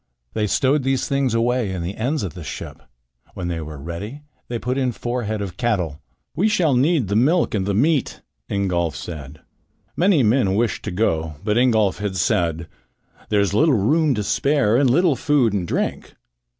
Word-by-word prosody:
They 105 -1 0
stowed 135 +7 +2
these 135 0 0
things 135 -4 0
away 120 -2 +1
in 90 -2 -4
the 90 +4 -4
ends 130 +3 -1
of 95 - -4
the 90 -2 -9
ship. 75 - -7 0.5
When 90 -1 -4
they 85 -1 -3
were 75 -1 -7
ready 85 - -7 0.2
they 120 - -3
put 125 +3 -2
in 130 -2 +1
four 120 +1 -3
head 105 -1 -2
of 95 -2 -7
cattle. 90 - -1 0.3
"We 200 - +2
shall 180 -9 +2
need 140 - +2
the 100 - -1
milk 150 +10 +3
and 100 -3 0
perhaps 100 -1 0
the - - +4
meat," 155 -3 0 0.3
Ingolf 90 -6 0
said. 75 -3 -8 0.5
Many 175 -6 +3
men 105 -4 +2
wished 110 0 0
to 105 - -3
go, 80 -5 -1
but 105 0 0
Ingolf 110 -6 +2
had 100 -2 -3
said: 85 -2 0 0.6
"There 105 -1 +3
is 100 -1 0
little 150 +5 +4
room 145 +7 +2
to 105 - -2
spare 140 -1 +2
and 135 +1 +4
little 165 +3 +3
food 135 -7 +2
and 95 -4 -1
drink. - - -3
110 Hz, 190 wpm, -21 LUFS, 95-135 Hz, 0.6 s, the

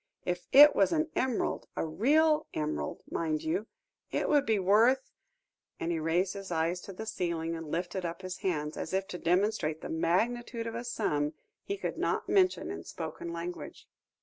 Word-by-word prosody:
if 180 0 -2
it 295 +2 +9
was 195 - +4
an 320 -1 0
emerald, 255 -3 0
a - - -1
real 300 - +3
emerald, 150 - -3
mind 155 -2 -1
you, 180 +7 -1 0.4
it - - -1
would 290 -2 +3
be 220 -1 +3
worth" 225 +8 +3 0.7
and 165 - -1
he 165 - 0
raised 175 +4 +1
his 195 -2 -8
eyes 170 +2 0
to 195 - -9
the 205 +4 -7
ceiling, 165 -5 -2
and 165 -2 -7
lifted 175 +2 -2
up 170 +2 -5
his 185 0 -5
hands, 150 -5 -2
as 160 - -4
if 190 0 0
to 180 - -6
demonstrate 175 -3 +1
the - - -6
magnitude 230 +8 0
of 230 - -4
a 235 +1 -4
sum 150 -11 -1 0.3
he 400 - -4
could - - -4
not - - 0
mention 370 -2 +2
in - - -6
spoken 170 - -6
language. 170 +1 -6
185 Hz, 180 wpm, -30 LUFS, 165-230 Hz, 0.7 s, it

